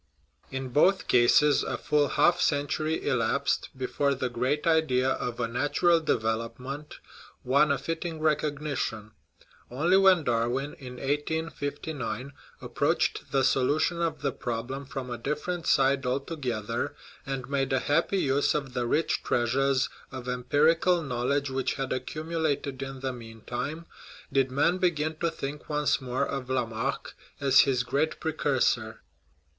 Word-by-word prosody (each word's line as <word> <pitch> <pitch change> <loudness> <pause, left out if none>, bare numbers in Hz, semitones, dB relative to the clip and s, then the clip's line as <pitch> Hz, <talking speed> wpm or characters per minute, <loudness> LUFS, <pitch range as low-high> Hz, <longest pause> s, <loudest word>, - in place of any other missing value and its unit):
In 135 -1 -4
both 180 +9 +3
cases 130 +4 +5
a - - -3
full 150 -1 +2
half 175 +4 +3
century 155 +2 0
elapsed 130 +3 +1
before 140 +2 0
the 130 -1 -2
great 130 +5 -1
idea 135 -6 +3
of 125 -2 -3
a 120 - 0
natural 145 +8 +2
development 125 +2 -2 0.5
won 140 +4 +3
a 140 - +2
fitting 165 +2 -4
recognition. 145 -8 -1 0.6
Only 165 +9 +3
when 190 -4 +5
Darwin 120 +3 0
(in 125 -2 -8
1859) 145 -1 -3 0.3
approached - - 0
the 135 -1 +2
solution 155 +7 +2
of 155 -4 -2
the 140 - +1
problem 125 +4 -4
from 130 -2 -5
a 120 - -4
differ 150 +7 -2
ent 175 -2 -4
side 135 0 +3
altogether, 125 -4 -2 0.3
and 135 -2 -4
made 135 -1 -1
a 130 - +3
happy 165 +8 +1
use 140 -4 +2
of 140 -4 -3
the 125 -1 -1
rich 160 +7 +1
treasures 130 +2 +1 0.2
of 130 -2 -7
empirical 155 +8 +2
knowledge 135 +2 -1
which 130 -1 -1
had 135 -1 -2
accumulated 150 0 -2
in 135 -1 -6
the 130 -1 -2
mean 115 -2 -11
time, 150 +9 -4 0.5
did 135 -1 +3
men 150 +7 +2
begin 155 -4 0
to 170 +1 0
think 145 -1 -6
once 150 -2 +1
more 125 0 -1
of 135 -2 -5
Lamarck 125 0 -2 0.3
as 135 -2 +5
his 130 -3 +4
great 145 +5 -1
precursor. 145 -5 0
140 Hz, 140 wpm, -28 LUFS, 125-150 Hz, 0.6 s, cases